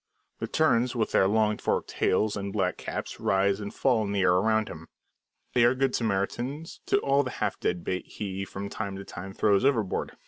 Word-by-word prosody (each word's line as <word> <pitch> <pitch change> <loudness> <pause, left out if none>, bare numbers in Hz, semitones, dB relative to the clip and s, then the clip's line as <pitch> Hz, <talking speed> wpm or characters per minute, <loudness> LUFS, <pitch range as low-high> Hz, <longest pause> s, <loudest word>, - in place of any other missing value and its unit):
The - - -3
terns, 125 -5 +2
with 115 -3 0
their 95 - +4
long 105 +1 +2
forked - - -1
tails 105 +3 +1
and 100 -1 -4
black 95 -3 0
caps - - -5
rise 100 +1 +2
and 105 -1 -5
fall 125 -5 +2
in 100 -1 -3
the 100 - +1
air 90 -1 +4
around 110 +4 +2
him. 80 0 -9 0.7
They 120 -1 +4
are 120 +2 +5
good 135 0 +1
Samaritans 120 +8 -2
to - - +3
all 140 +1 +3
the 130 - -3
half - - -1
dead 90 -1 -1
bait 90 0 -3
he 95 -2 -5
from 100 +1 -6
time 100 -1 -4
to 100 0 -7
time 95 +2 -8
throws 100 +1 +2
overboard. 115 -8 0
105 Hz, 205 wpm, -27 LUFS, 95-120 Hz, 0.7 s, are